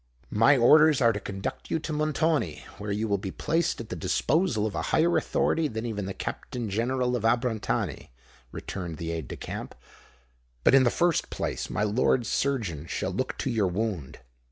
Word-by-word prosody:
"My 125 +7 +5
orders 150 +4 +6
are 115 -2 +4
to 105 - -3
conduct 100 -1 -5
you - - +1
to 155 0 -4
Montoni, 155 - 0
where 105 0 -4
you 105 +2 -1
will 100 -2 +1
be 95 - -4
placed 165 - 0
at 115 - -7
the - - -4
disposal 150 - +1
of 110 - -2
a - - -2
higher 170 +2 +3
authority 160 -1 +1
than 110 -3 -4
even 105 -4 -3
the 95 - -4
Captain 120 -4 -5
General 125 +3 0
of 115 - -3
Abrantani," 115 -1 0 0.4
returned 85 -5 -6
the 85 +1 -4
aide 80 -5 -4
de - - -6
camp. - - -6 0.9
"But, - - +5
in 135 -1 +7
the - - +5
first 170 +5 +1
place, - - -3
my 105 - -1
lord's 115 +2 +2
surgeon 100 - -1
shall - - -2
look - - -3
to 135 - -2
your 110 -4 +2
wound." 90 -6 -3
115 Hz, 185 wpm, -27 LUFS, 100-140 Hz, 0.9 s, in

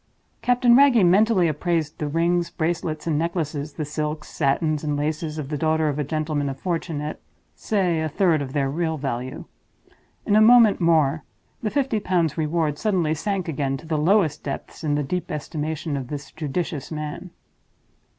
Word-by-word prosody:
Captain 245 -1 +4
Wragge 255 -7 +6
mentally 190 0 +4
appraised 160 0 -1
the 150 - -2
rings, 170 +3 +1
bracelets, 160 -2 -2
and 155 -3 +1
necklaces, 155 -3 -2
the 155 - -4
silks, 150 +1 -4
satins, 150 +1 0
and 150 -1 -1
laces 155 +1 -2
of 145 -3 -5
the 150 -2 -3
daughter 160 0 +2
of 145 0 -3
a - - +1
gentleman 150 -1 -2
of 135 0 -6
fortune, 165 -3 -2
at—say, 170 +3 -3
a 160 - -1
third 160 -1 +2
of 135 -2 -5
their 140 -2 +1
real 160 +3 -1
value. 130 0 -4 0.8
In 205 - +2
a 215 - +6
moment 225 -3 +6
more, 155 -3 +3 0.4
the 215 - -1
Fifty 265 -3 0
Pounds 170 -6 0
Reward 155 -1 -1
suddenly 180 -8 +1
sank 185 +3 -2
again 140 -3 -1
to 135 - -13
the 155 -1 -1
lowest 160 -2 +2
depths 140 +3 -6
in 145 -2 +1
the 145 - 0
deep 180 +6 -3
estimation 155 0 -3
of 135 -3 -4
this 140 0 -7
judicious 150 -1 -4
man. 155 +4 -5
155 Hz, 170 wpm, -23 LUFS, 150-175 Hz, 0.8 s, Wragge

